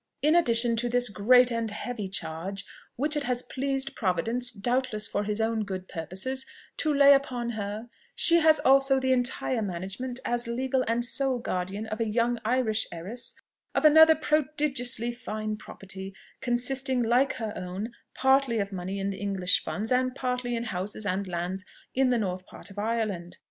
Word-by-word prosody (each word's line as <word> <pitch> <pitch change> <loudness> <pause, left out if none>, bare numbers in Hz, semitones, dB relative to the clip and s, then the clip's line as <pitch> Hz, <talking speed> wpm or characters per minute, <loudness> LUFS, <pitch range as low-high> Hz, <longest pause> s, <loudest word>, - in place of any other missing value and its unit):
In 305 +3 +4
addition 235 -7 +4
to 240 +2 0
this 245 0 +2
great 245 +5 +5
and 230 -1 -1
heavy 210 0 -5
charge, 185 +2 -5 0.3
which 300 +4 0
it 295 - 0
has 250 0 0
pleased 270 0 -3
Providence, 225 +6 0
doubtless 235 0 -1
for 205 - -2
his 210 +1 -2
own 225 0 0
good 190 -2 -6
purposes, 190 +11 -3 0.3
to 310 - +1
lay 280 -1 +7
upon 250 -4 0
her, 215 +1 -5 0.3
she 340 - +5
has 315 -1 +6
also 270 0 +5
the 260 0 0
entire 250 -1 0
management, 200 +7 -4
as 240 0 -1
legal 255 +2 0
and 235 +1 +1
sole 265 0 0
guardian 195 -1 -3
of 215 0 -5
a 225 -1 0
young 235 +2 +1
Irish 225 -2 0
heiress, 185 +8 -6 0.4
of - - +1
another 320 +1 +8
prodigiously 280 -6 +2
fine 215 -3 -4
property, 195 -2 -7 0.3
consisting, 255 +1 +1
like 245 +4 +2
her 220 -4 -4
own, 185 +5 -5 0.2
partly 265 -3 +3
of 200 -1 -2
money 190 +1 -4
in 195 0 -2
the 195 - -7
English 195 -2 0
funds, 220 +3 -4
and 255 0 +1
partly 250 -2 -2
in 230 - -2
houses 205 0 -4
and 195 0 -1
lands 180 +2 -3 0.3
in 265 0 +2
the 245 - +2
north 185 -4 -3
part - - -11
of 200 - -8
Ireland. 205 -5 -2
235 Hz, 170 wpm, -27 LUFS, 200-260 Hz, 0.4 s, another